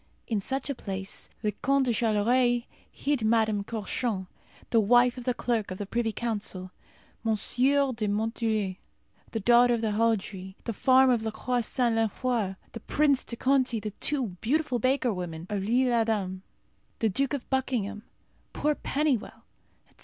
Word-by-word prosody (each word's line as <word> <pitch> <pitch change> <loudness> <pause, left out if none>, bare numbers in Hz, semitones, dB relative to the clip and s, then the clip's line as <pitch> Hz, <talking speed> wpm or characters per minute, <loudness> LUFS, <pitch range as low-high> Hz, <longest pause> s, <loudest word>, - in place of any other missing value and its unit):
In 220 -3 -1
such 265 +6 -2
a 280 - -1
place 195 -5 -5
the 210 - +1
Count 275 +6 +1
de 245 - +1
Charolais 240 +3 +2 0.3
hid 280 -5 -1
Madame 220 -2 +2
Courchamp, 215 -1 -2 0.5
the 230 - +5
wife 240 +3 +4
of 250 -2 -8
the 250 - +1
Clerk 225 -4 -1
of 185 - -5
the 205 - -4
Privy 225 +2 -1
Council; 205 -5 -3 0.5
Monsieur 260 +5 +2
de 220 -2 -2
Monthulé, 215 -2 -1 0.5
the 225 - -2
daughter 240 +3 +5
of 230 - -3
Haudry, 210 -4 -1
the 230 - -3
farmer 260 +3 +5
of 235 - 0
La 220 - -2
Croix 245 +3 -1
Saint 235 +1 0
Lenfroy; 225 -2 0 0.2
the 230 - -7
Prince 280 +3 +2
de 235 - -5
Conti, 260 -2 +2
the 215 0 -5
two 260 +2 0
beautiful 265 0 0
baker 255 -1 +1
women 170 -3 -5
of 205 -2 -1
L'Ile 245 +5 +2
Adam; 210 -5 0 0.6
the 225 - +1
Duke 270 +7 0
of 265 - -7
Buckingham, 235 -6 -1 0.5
poor 300 0 +1
Pennywell, 285 -5 -1 0.4
etc. - - -31
230 Hz, 160 wpm, -28 LUFS, 210-255 Hz, 0.6 s, the